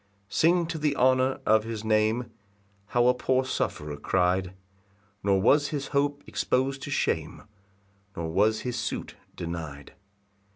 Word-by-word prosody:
2 -, -, -39 dB
Sing 170 Hz, +1 st, +4 dB
to 165 Hz, -1 st, -4 dB
the 150 Hz, -1 st, +1 dB
honour 130 Hz, 0 st, +3 dB
of 110 Hz, 0 st, +4 dB
his 110 Hz, -1 st, -5 dB
name, 110 Hz, +2 st, +1 dB, 0.6 s
How 120 Hz, +2 st, +2 dB
a 125 Hz, -, +5 dB
poor 130 Hz, +1 st, +1 dB
sufferer 75 Hz, -, -3 dB
cry'd, 90 Hz, +3 st, 0 dB, 0.7 s
Nor 100 Hz, -1 st, +2 dB
was 145 Hz, +9 st, +4 dB
his 140 Hz, -3 st, -4 dB
hope 145 Hz, 0 st, 0 dB
expos'd 135 Hz, +1 st, -1 dB
to -, -, -6 dB
shame, 80 Hz, -, -1 dB, 0.7 s
Nor 80 Hz, -1 st, -3 dB
was 105 Hz, +5 st, +2 dB
his 125 Hz, -1 st, -3 dB
suit 120 Hz, -, -4 dB, 0.2 s
deny'd. 80 Hz, -5 st, -6 dB
120 Hz, 140 wpm, -27 LUFS, 95-135 Hz, 0.7 s, a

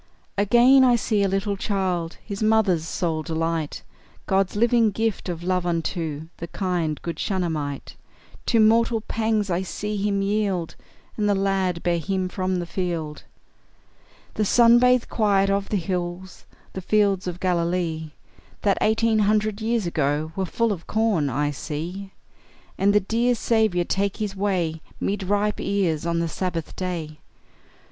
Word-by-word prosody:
Again, 240 Hz, +6 st, +5 dB
I 250 Hz, -2 st, +5 dB
see 220 Hz, -3 st, 0 dB
a 200 Hz, -, +3 dB
little 195 Hz, +1 st, -1 dB
child, 185 Hz, -4 st, -2 dB
His 200 Hz, -1 st, -6 dB
mother's 215 Hz, -7 st, +2 dB
sole 165 Hz, -3 st, -1 dB
delight, 160 Hz, -1 st, -2 dB, 0.4 s
God's 195 Hz, 0 st, +1 dB
living 235 Hz, +1 st, +3 dB
gift 220 Hz, -1 st, -2 dB
of 170 Hz, -1 st, -4 dB
love 180 Hz, 0 st, 0 dB
unto 165 Hz, -3 st, -2 dB
The 170 Hz, -, -6 dB
kind, 170 Hz, -4 st, -2 dB
good 170 Hz, -, -4 dB
Shunammite; 160 Hz, -7 st, -3 dB, 0.5 s
To 230 Hz, -, +3 dB
mortal 225 Hz, +1 st, +4 dB
pangs 220 Hz, -2 st, -1 dB
I 175 Hz, +1 st, +1 dB
see 210 Hz, +3 st, -4 dB
him 200 Hz, 0 st, 0 dB
yield, 195 Hz, -4 st, -1 dB, 0.4 s
And 210 Hz, -1 st, +1 dB
the 205 Hz, -, +3 dB
lad 195 Hz, -3 st, 0 dB
bear 170 Hz, -1 st, +1 dB
him 185 Hz, +2 st, -2 dB
from 185 Hz, 0 st, -2 dB
the 175 Hz, -1 st, -2 dB
field. 170 Hz, -4 st, -4 dB, 1.1 s
The 215 Hz, -, 0 dB
sun 235 Hz, +3 st, +6 dB
bathed 250 Hz, 0 st, +3 dB
quiet 200 Hz, -3 st, +2 dB
of 200 Hz, 0 st, -1 dB
the 210 Hz, -, +1 dB
hills, 180 Hz, 0 st, -4 dB, 0.3 s
The 190 Hz, -, -5 dB
fields 200 Hz, -1 st, +1 dB
of 180 Hz, 0 st, -4 dB
Galilee, 170 Hz, -3 st, -1 dB, 0.5 s
That 200 Hz, -2 st, +2 dB
eighteen 220 Hz, 0 st, +2 dB
hundred 210 Hz, 0 st, +1 dB
years 225 Hz, -2 st, 0 dB
ago 150 Hz, -1 st, -1 dB
Were 190 Hz, -1 st, -1 dB
full 230 Hz, +5 st, 0 dB
of 175 Hz, -5 st, -5 dB
corn, 210 Hz, -10 st, +1 dB
I 145 Hz, +3 st, 0 dB
see; 170 Hz, +7 st, -5 dB, 0.6 s
And 200 Hz, +1 st, +3 dB
the 210 Hz, 0 st, +4 dB
dear 235 Hz, +5 st, +1 dB
Saviour 220 Hz, -7 st, +1 dB
take 195 Hz, +1 st, -1 dB
his 205 Hz, -2 st, -3 dB
way 180 Hz, -5 st, -1 dB, 0.2 s
'Mid 200 Hz, +1 st, -1 dB
ripe 205 Hz, +2 st, 0 dB
ears 170 Hz, -6 st, 0 dB
on 170 Hz, 0 st, 0 dB
the 170 Hz, 0 st, 0 dB
Sabbath 165 Hz, -1 st, -4 dB
day. 165 Hz, -5 st, -4 dB
190 Hz, 155 wpm, -24 LUFS, 170-210 Hz, 1.1 s, sun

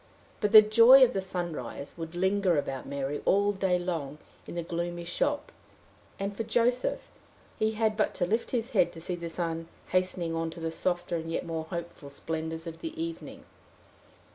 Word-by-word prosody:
But 210 Hz, -2 st, 0 dB
the 215 Hz, -1 st, +11 dB
joy 230 Hz, +5 st, +8 dB
of 255 Hz, -, +4 dB
the 195 Hz, -, -1 dB
sunrise 170 Hz, -8 st, -5 dB
would 165 Hz, 0 st, -7 dB
linger 190 Hz, -1 st, +2 dB
about 135 Hz, -2 st, -3 dB
Mary 140 Hz, +1 st, -3 dB
all 200 Hz, +1 st, +3 dB
the 195 Hz, -, -10 dB
day 185 Hz, -2 st, +2 dB
long 165 Hz, -5 st, -3 dB, 0.3 s
in -, -, -7 dB
the 170 Hz, -, -2 dB
gloomy 170 Hz, +1 st, -4 dB
shop; 290 Hz, -, -1 dB, 0.7 s
and 200 Hz, +1 st, -3 dB
for 225 Hz, -, -3 dB
Joseph, 240 Hz, +3 st, 0 dB, 0.5 s
he 220 Hz, 0 st, +1 dB
had 215 Hz, 0 st, +1 dB
but 215 Hz, -, 0 dB
to 180 Hz, -, 0 dB
lift 225 Hz, +6 st, -1 dB
his 240 Hz, 0 st, -2 dB
head 175 Hz, -6 st, +3 dB
to 165 Hz, -, -9 dB
see 175 Hz, +2 st, -4 dB
the 170 Hz, -1 st, -5 dB
sun 165 Hz, 0 st, -3 dB, 0.2 s
hastening 185 Hz, -2 st, 0 dB
on 165 Hz, 0 st, -1 dB
to 165 Hz, -, -9 dB
the 165 Hz, 0 st, -3 dB
softer 175 Hz, 0 st, -1 dB
and 165 Hz, 0 st, -5 dB
yet 165 Hz, -, -2 dB
more 165 Hz, -1 st, -3 dB
hopeful 170 Hz, -3 st, -7 dB
splendors 160 Hz, +3 st, -4 dB
of 165 Hz, -1 st, -7 dB
the 325 Hz, 0 st, -6 dB
evening. 330 Hz, 0 st, -6 dB
175 Hz, 190 wpm, -29 LUFS, 165-210 Hz, 0.7 s, the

